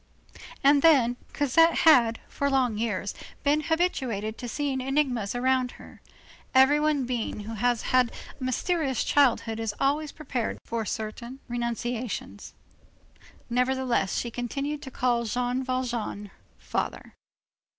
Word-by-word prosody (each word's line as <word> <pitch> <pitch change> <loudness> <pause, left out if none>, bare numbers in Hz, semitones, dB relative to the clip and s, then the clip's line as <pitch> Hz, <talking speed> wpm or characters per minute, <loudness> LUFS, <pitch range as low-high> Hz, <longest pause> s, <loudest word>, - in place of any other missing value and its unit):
And 280 +1 +6
then, 265 -7 +5 0.2
Cosette 325 +4 +4
had, 235 -8 +6
for 280 - -1
long 255 -5 +2
years, 205 -3 -2 0.3
been 295 +2 +3
habituated 260 - -1
to 245 - -5
seeing 275 0 -2
enigmas 255 -6 0
around 255 0 +1
her; - - -14 0.5
every 270 +3 +6 0.2
being 240 -4 -3
who 220 +2 -6
has 240 +2 0
had 255 -2 +3 0.3
a - - -7
mysterious 270 +1 0
childhood 235 -5 +2
is 220 -2 -3
always 290 +2 +1
prepared 265 -7 -3
for 230 -1 -3
certain 235 +4 -5
renunciations. 235 - -4 0.9
Nevertheless, 250 -4 0
she 235 - -2
continued 275 +5 -3
to 265 - -7
call 245 -2 0
Jean 245 +3 -1
Valjean: 240 -6 -3 0.3
Father. - - -4
250 Hz, 120 wpm, -27 LUFS, 230-275 Hz, 0.9 s, And